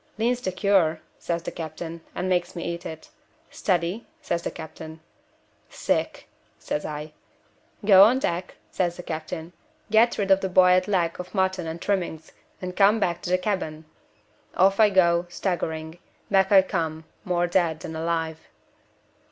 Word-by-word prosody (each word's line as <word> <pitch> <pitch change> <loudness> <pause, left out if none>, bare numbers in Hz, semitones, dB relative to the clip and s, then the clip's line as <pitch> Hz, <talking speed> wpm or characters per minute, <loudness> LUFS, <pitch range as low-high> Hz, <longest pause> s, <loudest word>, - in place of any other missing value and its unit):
'Lean's 240 +3 0
the 190 - -2
cure,' 185 -4 +2 0.2
says 170 -1 -3
the - - -4
captain, 165 +1 -7
and 185 - -2
makes 180 -1 0
me 170 - -4
eat 170 0 -4
it. 160 -1 -10 0.4
'Steady?' 180 +4 -1
says 175 - -2
the - - -3
captain. 160 0 -9 0.7
'Sick,' - - -2 0.3
says 150 - -4
I. 150 0 -6 0.7
'Go 195 -2 +8
on 245 +4 +4
deck,' 180 -8 -2 0.2
says 175 -2 -1
the 180 - -7
captain; 160 +1 -6 0.4
'get 225 +2 +4
rid 195 -2 0
of 195 0 +5
the 190 - -1
boiled 185 0 +5
leg 175 -5 0
of 180 +3 -8
mutton 190 -2 0
and 160 +1 -5
trimmings 175 -5 -2 0.3
and 180 0 -5
come 205 +3 +5
back 175 -3 -1
to - - -5
the 180 - +3
cabin.' 180 -5 -3 0.7
Off 195 +2 +4
I 215 -1 +7
go, 175 -3 +3
staggering 160 -3 -3 0.3
back 195 0 +3
I 195 -2 +8
come, 160 -4 -3 0.2
more 175 -1 +1
dead 175 -3 +1
than 160 - -6
alive. 160 -1 -2
175 Hz, 160 wpm, -25 LUFS, 165-190 Hz, 0.7 s, Go